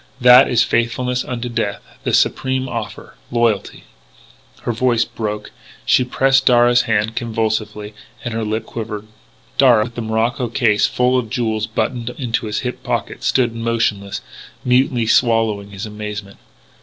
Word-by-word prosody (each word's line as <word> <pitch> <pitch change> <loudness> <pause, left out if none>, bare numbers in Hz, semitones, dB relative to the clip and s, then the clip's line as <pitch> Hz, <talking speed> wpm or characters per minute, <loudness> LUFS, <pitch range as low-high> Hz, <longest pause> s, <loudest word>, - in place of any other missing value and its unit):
That 125 +1 +7
is 120 - +4
'faithfulness 125 +2 0
unto 125 -1 -4
death' 105 -4 -3 0.2
the - - 0
supreme 130 0 +1
offer 115 -4 -6 0.2
loyalty 115 -4 0 0.4
" - - -27
Her - - -1
voice 120 0 +1
broke; 105 -1 -5 0.3
she - - +4
pressed 135 +1 +2
Darragh's 120 0 +5
hand 110 0 +1
convulsively 110 -2 -2 0.3
and 120 - -3
her 115 0 -2
lip 110 +1 -2
quivered. 110 -2 -6 0.5
Darragh, 120 -5 +6
with 120 - -7
the 120 - -5
morocco 115 +3 0
case 110 -3 +2
full 125 +1 +2
of 115 -3 -5
jewels 110 -3 -1
buttoned 115 +2 -2
into 120 -2 -2
his 105 0 -2
hip 125 -1 -4
pocket, - - -3
stood 120 -3 +2
motionless, 115 -4 -1 0.4
mutely 125 -1 +2
swallowing 110 -3 +2
his 100 0 -6
amazement. 105 -1 -7
115 Hz, 145 wpm, -19 LUFS, 110-125 Hz, 0.5 s, That